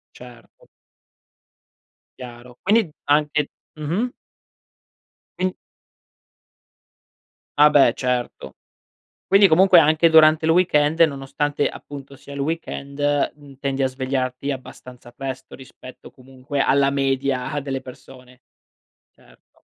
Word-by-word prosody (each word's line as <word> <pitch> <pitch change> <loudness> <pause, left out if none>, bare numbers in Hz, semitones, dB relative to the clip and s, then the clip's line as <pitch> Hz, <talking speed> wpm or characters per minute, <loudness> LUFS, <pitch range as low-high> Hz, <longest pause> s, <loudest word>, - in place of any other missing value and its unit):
Certo. 120 -2 -16 1.5
Chiaro, 125 -1 -12
quindi 210 -3 +2 0.2
anche 150 0 +1 0.3
mh-mh. 175 +12 -2 1.3
Quin 185 0 -1 2.1
Ah, 150 0 +7
beh 135 -5 +5
certo. 125 - -3 0.7
Quindi 195 0 +5
comunque 185 +2 +5
anche 160 +1 +3
durante 160 0 +5
il 160 - +3
weekend, 160 -2 +2
nonostante 145 -1 0
appunto 140 -1 -10
sia 140 - -15
il 140 - -7
weekend, 145 -1 -2
mhmm, 140 -2 -16
tendi 135 -1 -2
a - - +2
svegliarti 130 +1 -3
abbastanza 125 -2 -9
presto 130 +1 -7
rispetto 130 -1 -14
comunque 130 +2 -6
alla 140 0 +2
media 135 0 -1
delle 135 -1 -5
persone. 130 0 -15 0.7
Certo. - - -26
140 Hz, 100 wpm, -21 LUFS, 130-150 Hz, 2.1 s, Ah